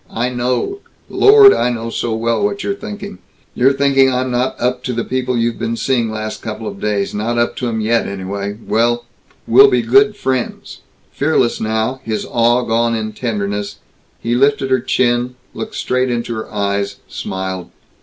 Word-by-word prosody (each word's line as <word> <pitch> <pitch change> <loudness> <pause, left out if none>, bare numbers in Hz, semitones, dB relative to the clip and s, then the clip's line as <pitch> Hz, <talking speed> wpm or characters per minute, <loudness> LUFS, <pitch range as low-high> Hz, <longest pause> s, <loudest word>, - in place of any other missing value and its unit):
I 120 +2 -1
know, 125 - -1 0.3
Lord 410 -1 +7
I - - +1
know 115 -1 -4
so 115 -1 -2
well 115 - 0
what 205 0 -1
you're 200 - -1
thinking! 205 -1 -8 0.3
You're 130 +2 +4
thinking 135 -1 +3
I'm 130 0 -1
not 125 +2 -1
up 125 +1 -1
to 125 - -2
the 115 0 -1
people 125 -1 -1
you've 115 0 -1
been 115 - -2
seeing 120 -4 0
last 110 0 -5
couple 110 0 -6
of 100 -2 -6
days 105 -2 -1
not 115 +3 -2
up 120 0 +1
to 125 - -2
'em 110 -1 -2
yet, 115 +2 +1
anyway. 100 +1 -4
Well 120 +1 +1 0.4
We'll 410 +1 +7
be - - +1
good 415 +1 +4
friends." 130 -2 -3 0.3
Fearless, 140 -5 +1
now, 110 +4 -1
his 110 -3 -3
awe 120 +1 +2
gone 115 0 +1
in 110 -1 -3
tenderness, 100 -3 -3 0.4
he 115 - -2
lifted 135 +1 +2
her 130 - +4
chin, 125 0 0 0.2
looked - - -6
straight 125 0 0
into 120 -1 -2
her 110 -1 -6
eyes, 100 -1 -1
smiled. 95 -1 -5
120 Hz, 175 wpm, -17 LUFS, 110-130 Hz, 0.4 s, Lord